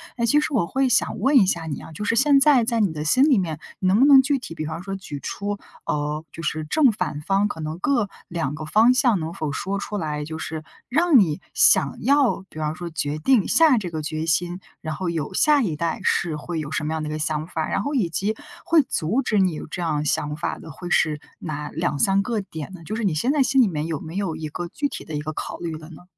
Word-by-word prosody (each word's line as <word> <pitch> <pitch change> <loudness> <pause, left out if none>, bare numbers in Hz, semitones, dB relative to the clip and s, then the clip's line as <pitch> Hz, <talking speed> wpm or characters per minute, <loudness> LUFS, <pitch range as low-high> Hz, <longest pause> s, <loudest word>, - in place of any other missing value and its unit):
哎， 235 - 0
其 290 +6 +4
实 300 - 0
我 210 -9 +2
会 265 0 +1
想 230 - +1
问 270 +6 +4
一 195 - +5
下 170 -3 -1
你 145 -3 -5
啊， - - -11
就 205 +7 -5
是 230 - +1
现 280 +2 +5
在 275 -4 +5
在 230 0 0
你 195 -7 +2
的 150 0 -4
心 255 - +4
里 280 -7 +4
面， 160 -5 -2 0.2
你 185 - 0
能 200 +4 +4
不 270 - +6
能 275 -2 +8
具 280 +1 +1
体 165 - -8
比 155 - -4
方 160 +2 -5
说 195 0 -4
举 180 -7 -7
出， 200 +8 -4 0.3
呃， 150 +1 -2
就 165 - -8
是 155 +1 -2
正 265 - +3
反 150 -7 -3
方 195 +5 +1
可 160 - -6
能 155 +1 -4
各 240 -2 +1 0.2
2 160 -4 -2
个 155 - -7
方 220 +9 +5
向 245 -6 +3
能 160 +1 -4
否 155 -2 -3
说 195 +7 -3
出 205 +1 -4
来， 150 -4 -3
就 160 +1 -6
是 155 0 -5 0.3
让 310 +1 +5
你 160 -7 +1
想 - - +4
要， 275 -8 +3
比 155 - -10
方 155 0 -2
说 175 0 -6
决 150 -2 -3
定 220 +5 +3
下 315 -6 +5
这 185 -5 -3
个 160 -1 -4
决 155 +1 -3
心， 175 +3 0 0.2
然 155 -1 -5
后 180 0 -3
有 165 +1 -3
下 295 +6 +4
一 175 -9 -1
代， 165 +1 -2
是 165 -3 +1
会 165 +2 -4
有 150 0 -7
什 155 - -1
么 155 - -2
样 160 - -3
的 150 - -4
一 - - -4
个 155 - -3
想 155 0 -1
法。 160 -3 -3
然 195 - -1
后 290 - -3
以 230 -10 +1
及， 200 +6 -1 0.3
会 330 -2 +4
阻 215 +5 0
止 215 -6 +1
你 185 -2 +3
有 155 - -7
这 175 - -5
样 150 -3 -1
想 150 0 0
法 170 - -3
的， 160 - -10
会 175 +4 -8
是 155 -3 +2 0.2
哪 150 -2 -5
2-3 175 +4 +1
个 225 0 -1
点 160 -2 -8
呢？ 170 -3 -11
就 215 - -4
是 230 - -3
你 195 -5 +1
现 235 - +1
在 285 -3 +3
心 260 +1 +3
里 225 - +4
面， 155 -4 -3
有 160 -3 -3
没 160 +3 -9
有 195 -5 -2
一 155 - -5
个 175 +3 -5
具 285 +10 -2
体 - - -7
的 160 - -9
一 - - -1
个 155 +1 -5
考 - - -5
虑 170 -2 -5
了 155 +1 -12
呢？ 165 - -13
175 Hz, 285 characters per minute, -23 LUFS, 155-230 Hz, 0.3 s, 能